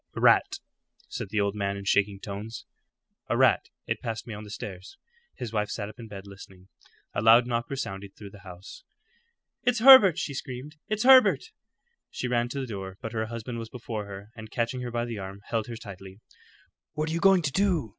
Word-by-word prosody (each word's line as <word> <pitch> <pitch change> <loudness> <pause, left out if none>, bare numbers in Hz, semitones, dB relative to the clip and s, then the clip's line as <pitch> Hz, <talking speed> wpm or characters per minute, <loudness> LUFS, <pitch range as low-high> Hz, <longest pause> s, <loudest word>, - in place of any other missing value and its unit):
"A - - -4
rat," - - +4 0.5
said - - -5
the 110 - -1
old 100 -1 +1
man 100 -1 -2
in 100 - -8
shaking 100 0 +2
tones 105 +4 -7 0.6
"a - - +1
rat. - - +3 0.2
It - - -3
passed 115 -1 -4
me 115 - -7
on 105 +1 -7
the 105 - -11
stairs." 95 -2 -8 0.4
His 115 -2 -6
wife 105 -1 0
sat 105 -1 -4
up 110 - -14
in 115 - -8
bed 100 -2 -9
listening. 95 -1 -13 0.4
A - - -1
loud 115 +2 +7
knock 120 +2 -2
resounded 100 -8 -5
through 100 -2 -11
the 105 - -13
house. 95 - -12 0.8
"It's 245 -1 +1
Herbert!" 225 - +9
she 160 -5 -3
screamed. 135 +3 -7
"It's 215 +1 -1
Herbert!" 260 0 +6 0.6
She 125 - -4
ran 120 -1 0
to 140 - -4
the 135 - -3
door, 95 -5 -7
but 115 -3 -6
her 110 -1 -2
husband 115 +1 -6
was 115 -1 -7
before 110 -3 -6
her, 100 +2 -10
and 110 -1 -10
catching 120 +3 -2
her 125 - -4
by 120 0 -2
the 115 -3 -5
arm, 95 +1 -8
held 115 -2 -1
her 120 - -6
tightly. 100 -3 -11 0.7
"What 155 +1 -2
are - - -2
you 170 - 0
going 190 -1 +5
to 140 - 0
do?" 175 - +1
115 Hz, 210 wpm, -27 LUFS, 100-130 Hz, 0.8 s, Herbert